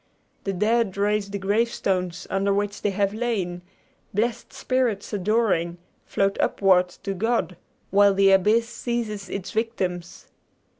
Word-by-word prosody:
The 195 - -1
dead 210 +1 +1
raise 205 0 +1
the 200 - -3
gravestones 195 -3 -1
under 195 +1 +1
which 205 +1 -1
they 205 - +1
have 200 0 0
lain; 210 -7 -2 0.5
blessed 225 +2 -1
spirits 245 -6 -1
adoring, 195 -4 +1 0.3
float 195 0 0
upward 185 -2 +3
to 195 - -2
God, 225 -1 0 0.4
while 200 0 +5
the 195 0 +5
abyss 210 +5 +4
seizes 230 -5 -4
its 195 0 -5
victims. 190 -6 -3
200 Hz, 130 wpm, -24 LUFS, 190-225 Hz, 0.5 s, while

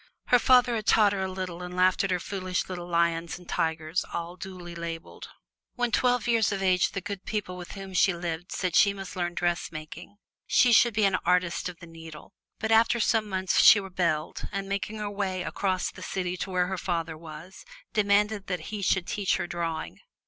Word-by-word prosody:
Her 245 - +6
father 250 -1 +5
had 220 -2 -3
taught 210 -2 +5
her 195 - -2
a 190 - -1
little 185 -2 -5
and 180 0 -7
laughed 185 +1 +3
at 195 - -1
her 180 -1 +1
foolish 185 0 -3
little 175 -2 -6
lions 170 -1 0
and 180 -1 -16
tigers, 160 +2 -1
all 170 +1 -4
duly 180 -2 -8
labeled. 170 -1 -7 0.5
When 245 -1 0
twelve 245 -1 +2
years 230 -3 +3
of 195 -1 -2
age 185 -1 +2
the 195 - -3
good 200 0 -6
people 205 -4 -3
with 175 -1 -8
whom 195 -1 -8
she 190 +2 +4
lived 170 0 -5
said 185 -3 -2
she 200 - +5
must 195 -1 -8
learn 175 -1 -2
dressmaking. 175 +2 -4 0.3
She 245 -1 +4
should 235 -1 +5
be 215 -1 +3
an 195 -1 +3
artist 180 0 +1
of 175 - -10
the 170 - -12
needle. 165 +1 -12 0.2
But 220 0 -2
after 230 +1 +4
some 220 -1 +1
months 190 -1 +2
she 215 - +9
rebelled 175 -5 -2
and, 195 0 -3
making 200 +2 -3
her 210 -1 -4
way 190 -3 -2
across 185 -1 -1
the - - -13
city 180 -1 -3
to 195 - -4
where 180 -1 +1
her 185 0 -3
father 165 -3 -2
was, 160 +3 -11 0.3
demanded 205 0 +2
that 180 -1 -4
he 210 - -3
should 190 -1 +1
teach 200 0 0
her - - -2
drawing. 165 -2 -4
185 Hz, 205 wpm, -27 LUFS, 175-200 Hz, 0.5 s, she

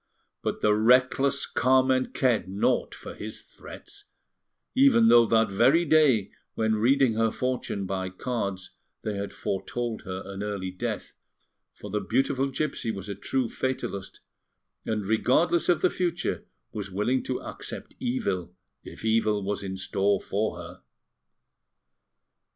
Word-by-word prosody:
But - - -3
the 105 - +4
reckless 130 +5 +3
Carmen 130 0 +3
cared 120 -8 +1
naught 95 +2 0
for - - -9
his - - -8
threats, 410 0 -12 0.7
even 250 -4 +5
though 120 -1 +7
that 110 -2 +3
very 130 - +4
day, 140 - +4 0.2
when 110 0 +1
reading 130 +2 +3
her 115 +1 +2
fortune 125 -5 -2
by 95 0 -3
cards, 95 -3 -4 0.3
they 110 - -2
had 100 0 -4
foretold 115 +4 -3
her 95 -2 -6
an 100 0 -7
early 100 -3 -3
death; 110 +3 -4 0.6
for 105 - -9
the 105 - 0
beautiful 130 +6 +1
gipsy 135 -3 -2
was 100 -2 -5
a - - -2
true 125 +5 -1
fatalist, 115 -7 -4 0.7
and, 105 -2 -1
regardless 130 - +2
of 175 -2 +3
the 185 - +5
future, 175 -1 -2 0.3
was 100 -2 -5
willing 105 +7 0
to 130 - -2
accept - - -7
evil, 95 -8 -2 0.3
if - - -10
evil 110 -2 +2
was 100 +1 -2
in 95 -1 -5
store 100 +1 +1
for 105 +2 -2
her. - - -10
110 Hz, 140 wpm, -27 LUFS, 100-130 Hz, 0.7 s, though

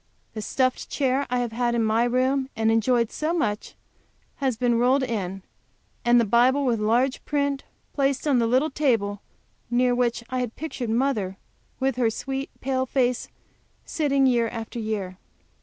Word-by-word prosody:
The 215 - -5
stuffed 255 +4 0
chair 275 0 0
I 250 - 0
have 240 -2 -2
had 240 +1 0
in 230 - +2
my 220 +2 +2
room, 260 +2 +1
and 220 0 +2
enjoyed 230 +1 +2
so 315 +3 -1
much, 210 -10 -2 0.6
has 265 -5 -1
been 240 -1 +2
rolled 260 +3 +3
in, 195 -6 -3 0.6
and 240 0 +5
the 235 - +3
Bible 250 +6 +3
with 235 -3 +1
large 240 +5 +1
print 280 -1 -1 0.3
placed 275 0 0
on 270 -4 +3
the 230 - +2
little 260 +6 +2
table 225 -9 0 0.5
near 245 +1 +2
which 240 -1 0
I 255 - -1
had 245 -2 -3
pictured 275 -7 -5
mother 225 -6 0 0.4
with 265 -2 0
her 240 -3 +3
sweet, 270 +4 -4
pale 260 0 -1
face, 250 -2 +1 0.6
as - - -12
sitting 280 -3 +2
year 240 -3 +3
after 230 +1 -6
year. 200 -4 -4
245 Hz, 170 wpm, -25 LUFS, 225-270 Hz, 0.6 s, and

